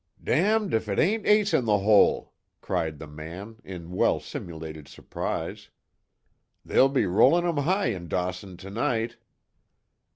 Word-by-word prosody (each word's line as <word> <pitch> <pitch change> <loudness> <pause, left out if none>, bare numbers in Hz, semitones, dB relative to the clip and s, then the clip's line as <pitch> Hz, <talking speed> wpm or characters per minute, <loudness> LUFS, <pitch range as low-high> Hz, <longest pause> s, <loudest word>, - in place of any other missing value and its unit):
"Damned 210 +3 +2
if 110 -1 0
it 100 - -1
ain't 215 +5 +1
Ace 210 0 +4
In 125 - +2
The 105 -2 +3
Hole!" 100 +1 +3 0.3
cried 80 -2 -2
the 80 - -8
man, 85 +9 -9
in 90 -2 -9
well 90 - +2
simulated 80 -3 -8
surprise. - - -5 1.0
"They'll 135 - +4
be 135 -5 +1
rollin' 135 - +4
'em 170 -3 0
high 185 -4 +1
in 85 -2 -7
Dawson 90 +1 -3
tonight!" 115 +4 -2
105 Hz, 135 wpm, -26 LUFS, 90-145 Hz, 1.0 s, Ace